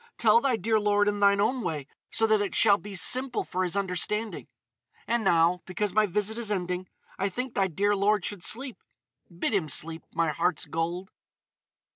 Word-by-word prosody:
Tell 230 0 +5
thy 265 -2 +1
dear 220 +1 +1
lord 205 0 +2
in 205 0 0
thine 200 0 +4
own 240 +5 +1
way, 155 -8 -3 0.3
so 225 - +2
that 215 -1 +3
it 205 - -3
shall 205 -2 +5
be 205 -1 -9
simple 250 +8 +1
for 185 +1 -2
his 180 +2 -1
understanding.... 200 +3 -2 0.6
And 235 -1 0
now—because 180 +3 +1
my 215 0 +3
visit 210 +4 -1
is 220 -3 -3
ending—I 185 +1 -4
think 250 +5 -5
thy 195 -1 +1
dear 200 +4 +1
lord 200 -1 +1
should 200 -4 -4
sleep. 255 +4 0 0.5
Bid 175 +4 -3
him 180 -7 0
sleep, 160 +3 -2
my 165 -2 0
heart's 165 +1 -1
gold!" 170 +5 -3
200 Hz, 175 wpm, -27 LUFS, 180-215 Hz, 0.6 s, Tell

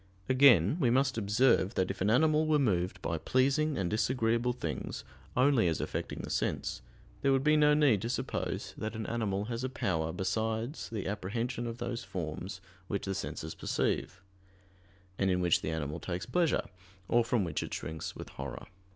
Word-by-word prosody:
Again 130 - +6
we 130 -7 +3
must 135 +2 +2
observe 110 -1 +3
that 95 0 +1
if 95 - -8
an 100 - +2
animal 155 +6 +4
were 155 -1 +4
moved 95 -8 +1
by 85 -1 -1
pleasing 140 - +2
and 95 - 0
disagreeable 115 +3 +1
things 125 - -4 0.3
only 130 -6 +4
as 80 - 0
affecting - - -4
the - - -5
sense, - - -1 0.4
there 140 - +3
would 135 0 +2
be 150 +1 +4
no 150 -1 +5
need 140 -10 +4
to 115 - -3
suppose 130 +2 -3
that 110 +1 -4
an 110 -1 -4
animal 105 -4 -1
has 115 +2 -4
a 130 - -1
power 80 -10 -1
besides 110 - -2
the 110 -4 -4
apprehension 115 +5 -2
of 115 0 -5
those 120 -1 -4
forms 95 +1 -5 0.3
which 100 - -2
the 95 - -1
senses 80 -4 -4
perceive, 95 +1 -2 1.0
and 95 - +2
in 90 -1 +2
which 90 -2 +3
the - - -3
animal 80 0 -3
takes 90 0 -4
pleasure, 165 +6 +1 0.4
or 120 0 +4
from 115 -2 +1
which 85 -4 -2
it - - -5
shrinks 80 0 -5
with - - -8
horror. - - -7
115 Hz, 180 wpm, -31 LUFS, 95-130 Hz, 1.0 s, Again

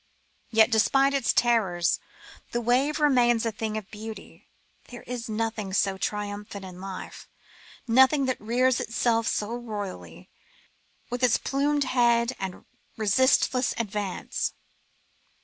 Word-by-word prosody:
Yet, 220 +1 +4
despite 270 +5 +3
its 275 -3 +2
terrors, 195 -8 +2 0.5
the 240 - +1
wave 255 +6 +1
remains 245 -6 +3
a 225 - 0
thing 215 0 -4
of 215 -1 -8
beauty. 220 +1 -10 0.4
There 245 - -10
is 245 -1 -6
nothing 220 -3 -3
so 195 0 +1
triumphant 205 -1 -4
in 185 -1 -10
life, 190 -1 -8 0.6
nothing 265 +4 +5
that 255 -1 -2
rears 245 +3 +2
itself 230 -1 0
so 210 +2 -1
royally, 205 - -7 0.8
with 245 +1 -3
its 250 -3 +4
plumed 285 +1 0
head 240 -1 +2
and 190 -1 -6 0.3
resistless 255 +4 +2
advance. 205 -4 -3
230 Hz, 120 wpm, -26 LUFS, 210-250 Hz, 0.8 s, nothing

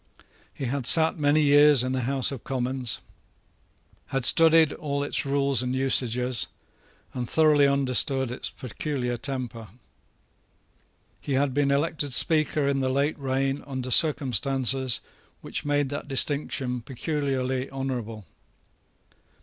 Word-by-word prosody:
He 135 - -7
had 130 0 -2
sate 160 0 +6
many 150 +1 +2
years 145 -2 +5
in 130 - -3
the 130 0 -2
House 135 -1 0
of 135 -4 -8
Commons, 130 -3 -2 1.1
had 135 -2 -1
studied 160 -1 +4
all 140 -1 -4
its 145 - -1
rules 140 -2 +2
and 125 0 -2
usages, 125 -2 +2 0.7
and 125 -2 -5
thoroughly 150 -3 +3
understood 135 -1 +1
its 125 - -4
peculiar 125 0 -5
temper. 120 -3 -5 1.5
He 140 - -4
had 135 0 0
been 145 0 0
elected 145 0 -1
speaker 155 0 +1
in 140 -1 0
the 130 -1 -1
late 140 +4 -1
reign 135 +1 -2
under 130 -2 -5
circumstances 130 - +2 0.4
which - - -5
made 145 -1 0
that 145 +1 -6
distinction 135 -2 0
peculiarly 130 -1 -3
honourable. 120 -6 -6
135 Hz, 125 wpm, -25 LUFS, 130-145 Hz, 1.5 s, sate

